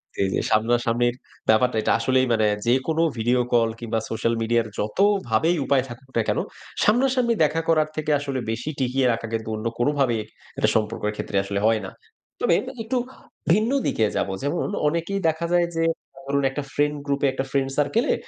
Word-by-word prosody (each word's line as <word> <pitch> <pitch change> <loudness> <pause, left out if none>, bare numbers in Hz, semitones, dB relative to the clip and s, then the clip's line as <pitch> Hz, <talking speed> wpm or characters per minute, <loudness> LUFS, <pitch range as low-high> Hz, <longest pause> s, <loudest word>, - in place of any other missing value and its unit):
জি, - - -2
জি, - - -2
যে - - +1
সামনাসামনির 120 +2 +2 0.3
ব্যাপারটা, 110 +1 +4
এটা - - +1
আসলেই 130 +2 +2
মানে 110 -1 +3 0.2
যেকোনো 135 +6 +2 0.2
ভিডিও 120 +3 +2
কল 115 -1 +4
কিংবা 115 -1 -2
সোশ্যাল 115 +1 0
মিডিয়ার 115 0 +1
যতভাবেই 170 - +2
উপায় 135 -2 +3
থাকুক 130 +2 -11
না - - +4
কেন, - - +1 0.4
সামনাসামনি 245 +1 +3
দেখা 160 +2 +1
করার 155 -1 +3
থেকে 155 0 -1
আসলে 140 -2 -3
বেশি 120 +6 -4
টিকিয়ে 130 0 +1
রাখা 115 -1 -4
কিন্তু 110 0 -3
অন্য 110 +2 -6
কোনভাবেই 130 -4 +1 0.4
একটা - - +2
সম্পর্কের 105 -1 0
ক্ষেত্রে 100 - -3
আসলে 100 0 -2
হয় 110 -1 +3
না। - - -7 0.5
তবে - - +2 0.3
একটু 250 +3 -1 0.5
ভিন্ন 215 +7 +3 0.2
দিকে 110 - +1
যাবো। 95 - -1
যেমন, 160 +7 -1 0.2
অনেকেই 170 +5 -1
দেখা 160 +2 -2
যায় 175 -1 +3
যে 165 - +1 0.4
ধরুন 140 0 +1
একটা 145 +1 -4
ফ্রেন্ড 145 0 +1
গ্রুপে, 140 0 0
একটা 135 0 -3
ফ্রেন্ড 135 -1 +1
সার্কেলে। 220 - +2
130 Hz, 175 wpm, -24 LUFS, 115-160 Hz, 0.5 s, ব্যাপারটা